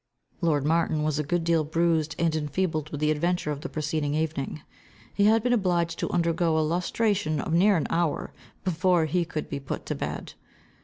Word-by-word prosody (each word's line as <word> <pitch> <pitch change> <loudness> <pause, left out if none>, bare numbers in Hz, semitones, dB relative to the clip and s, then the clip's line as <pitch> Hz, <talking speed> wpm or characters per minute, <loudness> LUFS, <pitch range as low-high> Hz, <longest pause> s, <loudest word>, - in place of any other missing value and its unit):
Lord 150 -5 +1
Martin 160 -1 +1
was 155 -1 0
a - - +1
good 170 +3 0
deal 165 -1 +2
bruised 160 0 +1
and 165 -1 +1
enfeebled 155 0 -1
with 150 - -5
the 155 0 +3
adventure 170 +1 0
of 145 -1 -4
the 170 - -5
preceding 150 -1 -1
evening. 155 -1 -2 0.5
He 200 - +2
had 220 +1 +4
been 245 0 +2
obliged 175 -6 +1
to - - -1
undergo 170 -1 +1
a 155 - +2
lustration 180 -1 0
of 160 - -2
near 190 +3 +5
an 155 - -1
hour, 165 -3 0 0.3
before 180 -1 +2
he 170 +3 0
could 155 -2 -4
be 140 - -4
put 135 - -5
to - - -2
bed. - - -5
165 Hz, 195 wpm, -26 LUFS, 155-175 Hz, 0.5 s, near